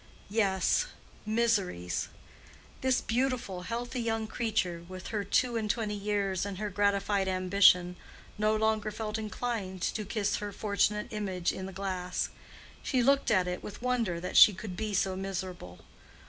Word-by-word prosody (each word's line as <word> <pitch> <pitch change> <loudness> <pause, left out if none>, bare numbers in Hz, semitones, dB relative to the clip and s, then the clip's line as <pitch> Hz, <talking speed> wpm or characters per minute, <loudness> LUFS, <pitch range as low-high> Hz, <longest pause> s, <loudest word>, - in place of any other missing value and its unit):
Yes—miseries. 200 - 0 0.7
This 260 -1 +2
beautiful, 240 -6 -1
healthy 240 +5 -3
young 225 -1 -1
creature, 215 -7 -1
with 185 0 -7
her 210 -2 -1
two 235 +4 +1
and 215 -2 -2
twenty 215 -1 0
years 200 -2 -1
and 200 -2 -4
her 210 0 -3
gratified 200 0 +1
ambition, 185 -1 +4 0.4
no 215 +1 +2
longer 215 -1 +1
felt 215 +1 -4
inclined 210 -4 -3
to 215 - -1
kiss 210 0 -1
her 205 -1 -4
fortunate 210 +1 0
image 190 -4 -1
in 190 - -5
the - - -7
glass. 185 -2 -2 0.5
She 255 -3 +1
looked 275 +2 +3
at 185 -4 +3
it 180 0 -3
with 210 +3 -9
wonder 235 -9 0
that 180 - -5
she 210 - +9
could 190 -1 -6
be 215 0 -2
so 190 0 +1
miserable. 185 - -5
205 Hz, 145 wpm, -30 LUFS, 185-220 Hz, 0.7 s, she